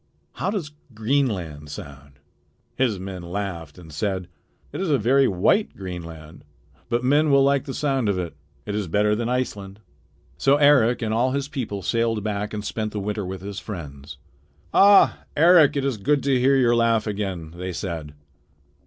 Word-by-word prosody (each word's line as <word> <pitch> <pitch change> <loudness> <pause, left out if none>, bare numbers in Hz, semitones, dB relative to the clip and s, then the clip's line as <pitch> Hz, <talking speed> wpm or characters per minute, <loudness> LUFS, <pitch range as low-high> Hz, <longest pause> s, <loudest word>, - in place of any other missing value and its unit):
How - - -3
does 190 -8 -3 0.2
Greenland 105 - -1
sound?" 70 -1 -10 0.6
His 125 -6 +1
men 95 -1 -6
laughed 85 -4 -5
and 80 -4 -13
said: 95 +1 -3 0.4
"It - - -5
is 190 - -1
a 145 - +3
very 130 +4 +3
white 110 - +1
Greenland, 85 -4 -8 0.5
but 120 +1 0
men 145 +4 +3
will 140 -1 +5
like 140 -1 +2
the 135 - -5
sound 135 -7 0
of 100 - 0
it. 85 -3 -4 0.3
It 105 - -4
is 105 -2 -2
better 105 +5 +2
than 115 +2 -2
Iceland." 105 -6 -3 0.6
So 135 +1 +4
Eric 135 -5 +4
and 110 0 -1
all 125 +3 +1
his 140 0 -2
people 120 -10 -5
sailed 115 0 0
back 105 0 -3
and 105 -1 -5
spent 110 0 -3
the 105 - -3
winter 105 +1 -3
with 95 -1 -6
his 100 0 -6
friends. 75 -8 -8 0.6
"Ah! 200 0 +6 0.2
Eric, 160 -2 +6
it 140 - -1
is 135 -5 -1
good 140 +7 +1
to 135 -2 +2
hear 135 +2 +4
your 120 -3 +3
laugh 115 -2 +2
again," 95 -6 -4
they 90 +1 -5
said. 80 -5 -5
105 Hz, 175 wpm, -23 LUFS, 90-135 Hz, 0.6 s, Ah